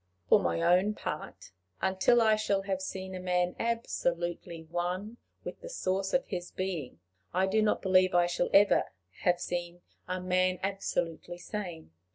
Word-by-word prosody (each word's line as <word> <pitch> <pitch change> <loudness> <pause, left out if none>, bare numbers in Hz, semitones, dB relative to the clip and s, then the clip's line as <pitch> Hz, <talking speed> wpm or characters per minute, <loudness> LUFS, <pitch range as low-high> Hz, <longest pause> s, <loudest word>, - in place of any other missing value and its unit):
For - - +7
my 85 -1 0
own 185 +5 +4
part, - - -6 0.3
until 190 +6 +3
I 220 -1 +5
shall 205 -2 0
have 190 -1 -2
seen 190 0 -5
a 185 - -5
man 180 -1 0
absolutely 175 -7 -2
one 180 +7 -3 0.3
with - - -7
the - - -8
source 195 - -1
of 265 - +2
his 175 -3 -5
being, 170 - -4 0.4
I 185 +1 +3
do 210 +3 +2
not 215 - +1
believe 185 -1 +4
I 175 0 +5
shall 175 0 0
ever 200 +1 +4 0.3
have 175 -1 +2
seen 175 0 -4 0.2
a 185 0 -2
man 185 0 +1
absolutely 175 -3 -2
sane. 175 - -6
185 Hz, 160 wpm, -30 LUFS, 175-195 Hz, 0.4 s, For